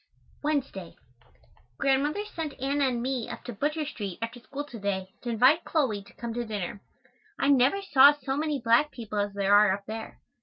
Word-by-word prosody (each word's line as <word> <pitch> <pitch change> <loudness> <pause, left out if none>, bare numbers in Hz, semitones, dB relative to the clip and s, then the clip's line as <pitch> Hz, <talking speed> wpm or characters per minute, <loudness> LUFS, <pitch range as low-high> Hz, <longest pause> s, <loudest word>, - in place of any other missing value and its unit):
Wednesday. 275 - -2 0.8
Grandmother 290 +9 +1
sent 320 -8 -6
Anna 275 +1 +1
and 240 -2 -1
me 255 -3 -2
up - - -7
to 245 - -6
Butcher 300 +7 -1
Street 205 - -5
after 230 +2 -5
school 280 +4 -6
to 245 -6 -10
day 190 -2 -3
to 245 - -5
invite 255 +8 +4
Chloe 260 -11 0
to 200 - -18
come 235 -1 -6
to 240 +1 -2
dinner. 205 -3 -5 0.6
I 275 - +1
never 280 +8 +4
saw 285 -6 +7
so 270 -2 -4
many 300 -1 -1
black 235 +5 +3
people 220 -6 -5
as 205 0 -2
there 200 0 +2
are 205 -1 +6
up 200 +1 -3
there. 220 +1 -7
245 Hz, 190 wpm, -27 LUFS, 210-290 Hz, 0.8 s, saw